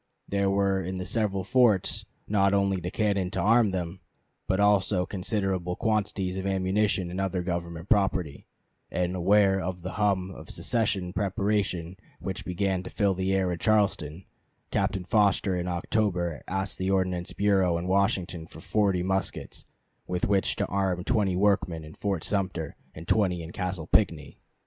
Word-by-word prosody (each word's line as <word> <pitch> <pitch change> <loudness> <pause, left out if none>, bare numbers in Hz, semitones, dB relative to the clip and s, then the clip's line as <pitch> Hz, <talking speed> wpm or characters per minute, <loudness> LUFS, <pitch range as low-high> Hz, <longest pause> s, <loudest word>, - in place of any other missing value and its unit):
There 100 0 +1
were 100 -1 +2
in 95 +1 -4
the 90 0 -4
several 100 -4 0
forts 110 -2 +2 0.2
not 100 -1 +3
only 100 -1 +2
the 90 - -3
cannon 100 -3 0
to - - -3
arm 115 0 +4
them, 90 -1 -4 0.5
but 95 - +1
also 100 -2 +3
considerable 95 -2 -2
quantities 100 -4 -1
of 95 0 -3
ammunition 95 -1 +1
and 95 +2 -2
other 95 -2 -1
government 85 -1 -4
property; 95 -8 +1 0.4
and 90 0 -1
aware 95 +2 +4
of 90 -1 -4
the 95 - -4
hum 95 -2 0
of - - -11
secession 100 -6 -1
preparation 95 -3 -1 0.2
which 95 -1 -5
began 95 +1 0
to 90 - -8
fill 100 -3 +1
the 95 +1 -1
air 95 -2 +1
in 85 - -3
Charleston, 95 -5 +1 0.5
Captain 95 - 0
Foster 100 0 +2
in 90 0 -2
October 90 -2 -1
asked 95 +1 -3
the 95 +1 -1
Ordnance 90 -2 0
Bureau 95 -4 +2
at 85 - -3
Washington 95 -3 0
for 80 - -12
forty 95 0 +1
muskets, 95 +1 -2 0.4
with 90 -1 -1
which 100 -1 +2
to - - 0
arm 95 -2 -1
twenty 100 -4 +1
workmen 95 -4 +1
in 75 0 -11
Fort 95 -3 -2
Sumter 95 -6 -2 0.2
and 80 +2 -9
twenty 90 -5 +2
in 80 - -8
Castle 90 -3 -3
Pinckney. 85 -6 +1
95 Hz, 160 wpm, -27 LUFS, 90-100 Hz, 0.5 s, arm